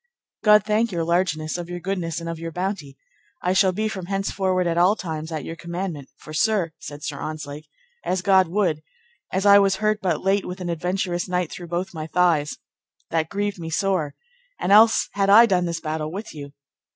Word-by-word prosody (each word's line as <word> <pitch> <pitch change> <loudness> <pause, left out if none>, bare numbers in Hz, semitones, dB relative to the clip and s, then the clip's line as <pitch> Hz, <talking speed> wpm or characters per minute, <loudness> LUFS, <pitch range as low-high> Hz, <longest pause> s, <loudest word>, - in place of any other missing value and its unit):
God 210 -1 +6
thank 215 +2 +1
your 170 -2 -1
largeness 170 -1 0
of 175 0 -6
your 175 0 -5
goodness 175 -3 -3
and 165 - -7
of 165 -1 -4
your 165 0 -5
bounty, 175 -6 -4 0.5
I 180 - +2
shall 190 0 +4
be 215 +4 -1
from 190 -5 -5
henceforward 190 -1 0
at 170 -1 0
all 180 +4 +4
times 160 -4 -5
at 155 -2 -4
your 165 - -6
commandment; 170 -4 -5
for, 155 - -11
sir, 200 -1 +1
said 145 0 -9
Sir 140 - -4
Ontzlake, 150 -1 -6 0.4
as 185 0 -1
God 190 -2 +5
would, 170 -4 0 0.5
as 190 +2 -1
I 200 0 +8
was 195 -1 +3
hurt 215 +1 0
but 175 -6 -1
late 195 +1 +1
with 180 +1 -6
an 180 -1 -4
adventurous 180 +1 -2
knight 180 -2 -1
through 175 - -8
both 175 +2 -3
my 155 -1 -5
thighs, 165 -4 +1 0.5
that 160 -1 0
grieved 205 -1 -2
me 165 -1 -5
sore, 180 -3 0 0.4
and - - -1
else 220 +2 +6
had 195 -1 0
I 220 +4 +9
done 185 -5 +1
this 170 -1 -2
battle 155 -1 -3
with 205 +5 -7
you. 140 -2 -8
180 Hz, 200 wpm, -23 LUFS, 160-195 Hz, 0.5 s, I